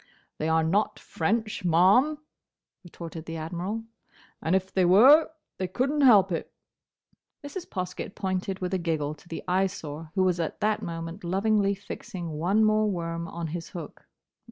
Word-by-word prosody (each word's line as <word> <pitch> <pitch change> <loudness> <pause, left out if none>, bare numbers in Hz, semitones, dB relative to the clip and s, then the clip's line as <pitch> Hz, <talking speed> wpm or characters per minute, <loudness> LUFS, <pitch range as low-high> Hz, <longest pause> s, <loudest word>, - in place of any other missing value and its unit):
"They 155 - 0
are 160 0 +3
not 195 +7 +1
French, 215 +6 -2
ma'am," 190 - +4 0.7
retorted 165 -2 -9
the 165 0 -5
Admiral, 175 +7 -4 0.6
"and 165 +4 +1
if 190 0 -1
they 190 - +3
were, 250 - +7 0.3
they 185 - -1
couldn't 275 +8 0
help 205 -8 +6
it." 165 - -3 0.9
Mrs. 345 +5 -7
Poskett 185 +1 -5
pointed 190 0 -3
with 180 +1 -2
a 190 - +1
giggle 155 -3 -1
to 155 - -18
the 165 - -6
Eyesore, 180 -5 -2
who 190 - +3
was 180 -2 +1
at 165 - -3
that 215 0 +1
moment 165 +1 -6
lovingly 200 +3 +1
fixing 190 -3 -7
one 180 +8 +2
more 215 0 +3
worm 170 -2 -3
on 170 0 -5
his 165 +1 -5
hook. 165 -4 -9
185 Hz, 155 wpm, -27 LUFS, 165-210 Hz, 0.9 s, were